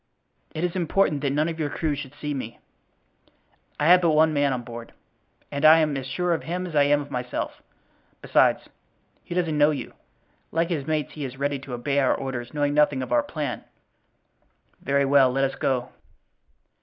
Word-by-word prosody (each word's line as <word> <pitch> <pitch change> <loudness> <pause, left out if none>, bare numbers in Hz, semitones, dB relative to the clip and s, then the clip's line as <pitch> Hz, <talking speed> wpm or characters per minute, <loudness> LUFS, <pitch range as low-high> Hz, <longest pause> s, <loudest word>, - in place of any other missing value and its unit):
"It 155 - -3
is 180 0 -1
important 170 -4 +1
that 140 - 0
none 150 +3 +1
of 165 -1 -5
your 150 -2 -1
crew 155 -1 -1
should 145 -1 -7
see 150 0 -4
me." 120 -4 -6 1.2
"I 150 - +1
have 180 +2 +7
but 170 - +3
one 155 0 +4
man 145 -1 +2
on 125 -2 -3
board, 115 0 -9 0.6
and 140 +1 -4
I 155 +1 +9
am 155 -3 +1
as 135 -1 -4
sure 180 +5 0
of 165 - -2
him 180 +2 -4
as 170 -4 -7
I 145 -1 +5
am 145 +1 +3
of 145 - -10
myself. 125 0 -4 0.6
Besides, - - +2 0.6
he 175 - -7
doesn't 170 -4 0
know 145 +1 +6
you; 150 -3 -4 0.6
like 165 +1 0
his 150 -6 -3
mates 155 -3 -1
he 150 - -6
is 130 -1 -6
ready 140 0 -1
to 130 -2 -7
obey 140 +4 0
our 135 - +3
orders 120 -3 -5
knowing 145 -1 0
nothing 145 -3 +2
of - - -8
our 300 - +4
plan." 150 - -4 1.2
"Very 140 +1 +1
well; 135 -2 +5
let 135 +2 0
us 135 0 0
go." 125 -2 -1
145 Hz, 195 wpm, -25 LUFS, 135-160 Hz, 1.2 s, I